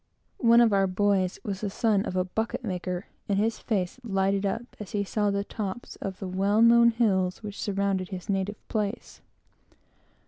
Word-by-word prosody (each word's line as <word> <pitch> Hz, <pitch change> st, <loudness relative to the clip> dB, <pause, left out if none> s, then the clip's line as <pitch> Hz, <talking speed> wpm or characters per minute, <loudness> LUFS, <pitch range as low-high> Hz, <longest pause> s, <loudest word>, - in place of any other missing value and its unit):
One 235 Hz, 0 st, +6 dB
of 225 Hz, -3 st, +4 dB
our 195 Hz, -1 st, +3 dB
boys 190 Hz, -1 st, +1 dB
was 195 Hz, -2 st, -4 dB
the 210 Hz, -, -1 dB
son 210 Hz, 0 st, +1 dB
of -, -, -4 dB
a 185 Hz, -, +2 dB
bucket 225 Hz, +7 st, -3 dB
maker; 180 Hz, -2 st, -3 dB, 0.2 s
and 200 Hz, -, +2 dB
his 220 Hz, +2 st, 0 dB
face 195 Hz, 0 st, -2 dB
lighted 195 Hz, -2 st, +1 dB
up 230 Hz, +5 st, -4 dB
as 210 Hz, -, -8 dB
he 205 Hz, -1 st, +1 dB
saw 205 Hz, +1 st, 0 dB
the 200 Hz, 0 st, 0 dB
tops 205 Hz, +2 st, -5 dB
of 190 Hz, -1 st, -5 dB
the 195 Hz, -, -5 dB
well 200 Hz, +4 st, +2 dB
known 235 Hz, 0 st, +7 dB
hills 200 Hz, -5 st, +1 dB
which 205 Hz, -1 st, -6 dB
surround 200 Hz, -1 st, 0 dB
his 185 Hz, 0 st, -7 dB
native 200 Hz, +1 st, -2 dB
place. 210 Hz, 0 st, -3 dB
200 Hz, 180 wpm, -27 LUFS, 190-220 Hz, 0.2 s, known